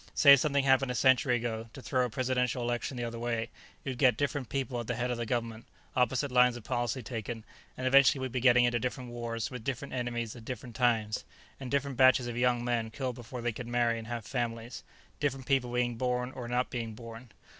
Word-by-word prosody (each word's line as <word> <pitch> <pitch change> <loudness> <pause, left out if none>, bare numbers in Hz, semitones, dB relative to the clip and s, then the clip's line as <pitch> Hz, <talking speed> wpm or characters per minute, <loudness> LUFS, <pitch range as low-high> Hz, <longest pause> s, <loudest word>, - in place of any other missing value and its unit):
Say 140 -2 +9
something 140 0 +1
happened 135 0 +3
a 125 - -2
century 125 +1 +4
ago, 115 -1 -3
to 135 - -9
throw 130 -2 +1
a - - -3
presidential 125 0 0
election 120 +2 -2
the 120 - -2
other 115 0 -4
way. 115 -1 -2 0.3
You'd 130 -3 -4
get 130 -3 +4
different 145 -3 -2
people 130 -3 -2
at 120 - -5
the 120 - -1
head 125 +1 -1
of 120 - -2
the 120 - -3
government, 115 -1 -3 0.3
opposite 130 +2 +1
lines 125 -1 +4
of 120 - -11
policy 120 +2 -2
taken, 115 -1 -5 0.3
and 130 - -4
eventually 135 +1 +6
we'd 130 -1 -3
be 130 - -1
getting 125 0 +5
into 120 -1 +1
different 125 +1 -4
wars 115 -1 -4
with 125 -3 -7
different 135 +2 -4
enemies 120 -3 -3
at 120 - -11
different 120 0 -7
times, 115 -4 +1 0.4
and 130 -2 -6
different 140 -1 -1
batches 130 -1 +6
of 120 -1 -4
young 120 0 +1
men 120 -2 0
killed 130 +2 -3
before 120 +1 -8
they 120 - +1
could 120 +2 -7
marry 120 -1 +1
and 110 - -9
have 120 -2 -5
families 120 -1 -4 0.4
different 135 -3 -1
people 130 -3 +1
being 120 -1 0
born 125 0 -1
or 125 -2 -7
not 125 +1 -1
being 115 -3 -4
born. 115 +1 -10
120 Hz, 220 wpm, -30 LUFS, 115-130 Hz, 0.4 s, Say